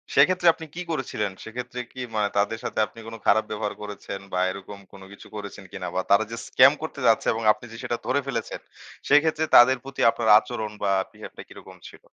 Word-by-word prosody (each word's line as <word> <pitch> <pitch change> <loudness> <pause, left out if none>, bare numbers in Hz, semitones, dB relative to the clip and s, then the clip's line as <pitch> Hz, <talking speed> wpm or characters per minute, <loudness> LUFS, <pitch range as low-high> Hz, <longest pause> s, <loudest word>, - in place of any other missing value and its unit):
সেক্ষেত্রে 175 +5 +4
আপনি 160 - -10
কি 180 - -4
করেছিলেন? 115 -9 -2
সেক্ষেত্রে 125 +2 -7
কি 130 - -7
মানে 105 -1 +2
তাদের 105 +3 0
সাথে - - -3
আপনি 110 +2 -15
কোন 115 - -7
খারাপ 110 +2 +4
ব্যবহার 105 -1 -3
করেছেন 100 -1 -7
বা 90 - 0
এরকম 100 +1 -9
কোন 100 - -14
কিছু 100 - -13
করেছেন 100 -1 -8
কিনা 95 -2 -6
বা 95 - +1
তারা 100 +2 +5
যে 115 - -5
স্ক্যাম 130 +2 +6
করতে 160 -3 -6
যাচ্ছে 115 - +3
এবং 115 0 -4
আপনি 120 - -5
যে 115 - -9
সেটা 120 - -2
ধরে 135 - +1
ফেলেছেন 135 - -4 0.5
সেক্ষেত্রে 155 +1 +4
তাদের 130 +2 +8
প্রতি 135 0 -6
আপনার 115 -1 -1
আচরণ 110 -3 -5
বা 100 - +2 0.2
বিহেভ - - -11
টা - - -7
কিরকম - - -13
ছিল? - - -17
115 Hz, 205 wpm, -25 LUFS, 105-130 Hz, 0.5 s, তাদের